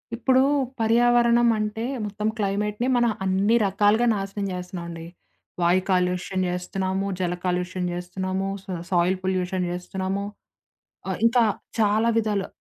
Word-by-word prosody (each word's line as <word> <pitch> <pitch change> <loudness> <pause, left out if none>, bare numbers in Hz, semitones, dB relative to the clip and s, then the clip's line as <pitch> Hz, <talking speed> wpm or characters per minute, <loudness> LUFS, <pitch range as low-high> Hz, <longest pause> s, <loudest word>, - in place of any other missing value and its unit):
ఇప్పుడు 260 +2 +3 0.4
పర్యావరణం 235 +1 +4
అంటే 215 +1 -2 0.2
మొత్తం 210 +1 -3
క్లైమేట్‌నే 210 +3 -1
మనం 240 -2 +3
అన్ని 195 +4 +2
రకాలుగా 205 +4 +3
నాశనం 200 0 -3
జేస్తున్నామండి. 175 -2 -6 0.6
వాయు 175 +2 +3
కాలుష్యం 180 +1 0
జేస్తున్నాము, 190 +2 -2
జల 175 -1 0
కాలుష్యం 180 0 -1
జేస్తున్నాము, 185 +2 -3 0.2
సో, - - -27
సా - - -7
సాయిల్ 180 +1 +2
పొల్యూషన్ 185 -1 -1
జేస్తున్నాము, 190 +2 -3 0.8
ఆహ్, - - -2
ఇంకా 235 +1 +4 0.4
చాలా 215 +2 +3
విధాలా 210 -3 0
195 Hz, 120 wpm, -24 LUFS, 180-215 Hz, 0.8 s, పర్యావరణం